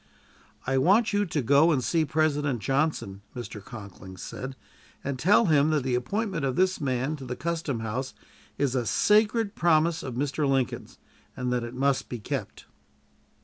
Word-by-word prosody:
"I 135 Hz, 0 st, +1 dB
want 205 Hz, -, +4 dB
you 205 Hz, 0 st, +1 dB
to 155 Hz, -3 st, -1 dB
go 140 Hz, +7 st, +5 dB
and 135 Hz, -5 st, +1 dB
see 160 Hz, +7 st, +1 dB
President 145 Hz, -3 st, +1 dB
Johnson," 135 Hz, -7 st, -1 dB
Mr. 115 Hz, -4 st, -7 dB
Conkling 100 Hz, -5 st, -10 dB
said, 130 Hz, +8 st, -7 dB, 0.5 s
"and 135 Hz, -2 st, -3 dB
tell 205 Hz, -, +5 dB
him 150 Hz, -3 st, +4 dB
that 150 Hz, -4 st, +1 dB
the 130 Hz, -1 st, -1 dB
appointment 180 Hz, -, -1 dB
of 130 Hz, -2 st, 0 dB
this 185 Hz, 0 st, +1 dB
man 130 Hz, +2 st, -1 dB
to 135 Hz, -, -10 dB
the 125 Hz, 0 st, -4 dB
custom 160 Hz, -7 st, -2 dB
house 120 Hz, +4 st, -4 dB, 0.4 s
is 140 Hz, -3 st, +1 dB
a 125 Hz, -3 st, -1 dB
sacred 215 Hz, -, +3 dB
promise 165 Hz, -2 st, +2 dB
of 130 Hz, -3 st, -6 dB
Mr. 140 Hz, +2 st, 0 dB
Lincoln's, 135 Hz, -3 st, -1 dB, 0.4 s
and 125 Hz, 0 st, -1 dB
that 120 Hz, -1 st, 0 dB
it 120 Hz, +1 st, -7 dB
must 135 Hz, +1 st, 0 dB
be 120 Hz, -, -4 dB
kept." 105 Hz, -, -5 dB
140 Hz, 170 wpm, -27 LUFS, 125-160 Hz, 0.5 s, go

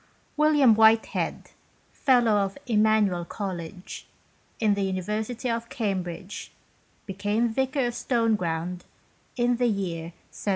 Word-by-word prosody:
William 295 Hz, -5 st, +5 dB
Whitehead, 220 Hz, +1 st, +2 dB, 0.4 s
Fellow 245 Hz, -6 st, +3 dB
of 195 Hz, -1 st, -1 dB
Emmanuel 215 Hz, -5 st, +2 dB
College, 180 Hz, -1 st, -6 dB, 0.5 s
in 215 Hz, -2 st, +3 dB
the 200 Hz, -, -1 dB
University 210 Hz, +6 st, -2 dB
of 230 Hz, 0 st, -2 dB
Cambridge, 190 Hz, -4 st, -4 dB, 0.5 s
became 205 Hz, +4 st, 0 dB
Vicar 265 Hz, +3 st, 0 dB
of 240 Hz, -, -2 dB
Stoneground 180 Hz, -9 st, 0 dB, 0.6 s
in 240 Hz, 0 st, +2 dB
the 245 Hz, 0 st, +2 dB
year 185 Hz, -7 st, -2 dB
1731. 170 Hz, -, -9 dB
215 Hz, 110 wpm, -26 LUFS, 190-240 Hz, 0.6 s, William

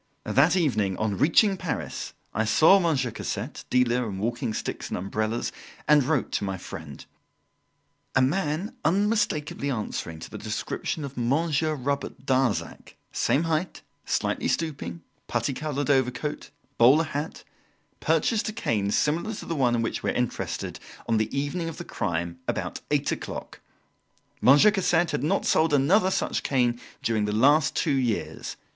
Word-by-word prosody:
That 150 Hz, +7 st, +4 dB
evening, 110 Hz, -, +1 dB
on 110 Hz, -2 st, 0 dB
reaching 195 Hz, +6 st, +4 dB
Paris, 175 Hz, -5 st, -4 dB, 0.2 s
I 110 Hz, -, +1 dB
saw 160 Hz, -, +6 dB
Monsieur 145 Hz, -9 st, +1 dB
Cassette, 115 Hz, +3 st, -5 dB
dealer 125 Hz, -2 st, +2 dB
in 95 Hz, -, -5 dB
walking 115 Hz, +3 st, -2 dB
sticks -, -, -4 dB
and -, -, -2 dB
umbrellas, 110 Hz, +5 st, -2 dB, 0.4 s
and 150 Hz, -1 st, +6 dB
wrote 145 Hz, -1 st, 0 dB
to -, -, -1 dB
my 95 Hz, -1 st, -2 dB
friend: 80 Hz, -6 st, -9 dB, 1.1 s
"A 135 Hz, -, +5 dB
man 170 Hz, -, -1 dB
unmistakably 195 Hz, -7 st, +1 dB
answering 105 Hz, -9 st, -3 dB
to -, -, -9 dB
the -, -, -7 dB
description 155 Hz, -, -3 dB
of 140 Hz, -1 st, -9 dB
Monsieur 155 Hz, +5 st, +1 dB
Robert 140 Hz, -1 st, -3 dB
Darzac 130 Hz, -5 st, 0 dB, 0.2 s
same 150 Hz, -, +1 dB
height, 165 Hz, +2 st, -2 dB, 0.2 s
slightly -, -, -1 dB
stooping, 135 Hz, -, -3 dB, 0.2 s
putty 140 Hz, -, -1 dB
coloured 145 Hz, 0 st, -1 dB
overcoat, 130 Hz, +2 st, 0 dB, 0.3 s
bowler 130 Hz, +7 st, +7 dB
hat 150 Hz, 0 st, -5 dB, 0.6 s
purchased 185 Hz, +8 st, +1 dB
a -, -, -5 dB
cane 105 Hz, -, 0 dB
similar 165 Hz, -, 0 dB
to -, -, -8 dB
the 165 Hz, -, -3 dB
one 125 Hz, -4 st, +2 dB
in 115 Hz, -, 0 dB
which 115 Hz, -, -2 dB
we -, -, -1 dB
are -, -, 0 dB
interested, 125 Hz, -1 st, -2 dB, 0.3 s
on 115 Hz, -, +2 dB
the 110 Hz, 0 st, 0 dB
evening 145 Hz, +5 st, -2 dB
of 165 Hz, -, -8 dB
the -, -, -7 dB
crime, 85 Hz, 0 st, -3 dB
about -, -, -3 dB
eight -, -, +1 dB
o'clock. -, -, -6 dB, 0.8 s
Monsieur 145 Hz, +11 st, +7 dB
Cassette 175 Hz, -4 st, +2 dB
had -, -, -1 dB
not 150 Hz, -, +1 dB
sold 155 Hz, -1 st, +3 dB
another 185 Hz, +8 st, +4 dB
such -, -, -1 dB
cane 120 Hz, -3 st, +1 dB, 0.2 s
during 110 Hz, -2 st, +1 dB
the 105 Hz, -, -1 dB
last 140 Hz, +8 st, +4 dB
two 160 Hz, -, +1 dB
years. 125 Hz, -5 st, -2 dB
140 Hz, 155 wpm, -26 LUFS, 115-160 Hz, 1.1 s, bowler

